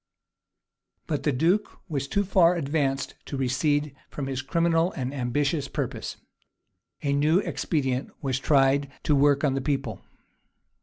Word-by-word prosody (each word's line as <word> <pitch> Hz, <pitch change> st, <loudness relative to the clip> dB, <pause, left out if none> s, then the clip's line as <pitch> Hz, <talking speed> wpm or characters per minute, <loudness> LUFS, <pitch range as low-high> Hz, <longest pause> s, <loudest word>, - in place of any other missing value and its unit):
But 150 Hz, -3 st, -2 dB
the 150 Hz, -, +1 dB
duke 170 Hz, +11 st, +1 dB
was 140 Hz, -5 st, -2 dB
too 200 Hz, +7 st, +1 dB
far 180 Hz, -3 st, +4 dB
advanced 140 Hz, -4 st, -1 dB
to 140 Hz, -, -4 dB
recede 145 Hz, +2 st, 0 dB
from 140 Hz, -, -5 dB
his 135 Hz, -1 st, -3 dB
criminal 165 Hz, +4 st, +2 dB
and 130 Hz, 0 st, -3 dB
ambitious 140 Hz, +3 st, 0 dB
purpose. 135 Hz, -5 st, -4 dB, 0.9 s
A 140 Hz, -1 st, +1 dB
new 150 Hz, +4 st, +3 dB
expedient 135 Hz, -9 st, -1 dB
was 130 Hz, -3 st, -1 dB
tried 140 Hz, 0 st, +3 dB
to 150 Hz, -, +3 dB
work 140 Hz, 0 st, +4 dB
on 140 Hz, -3 st, +2 dB
the 135 Hz, -, -1 dB
people. 135 Hz, +1 st, -2 dB
140 Hz, 140 wpm, -26 LUFS, 135-155 Hz, 0.9 s, far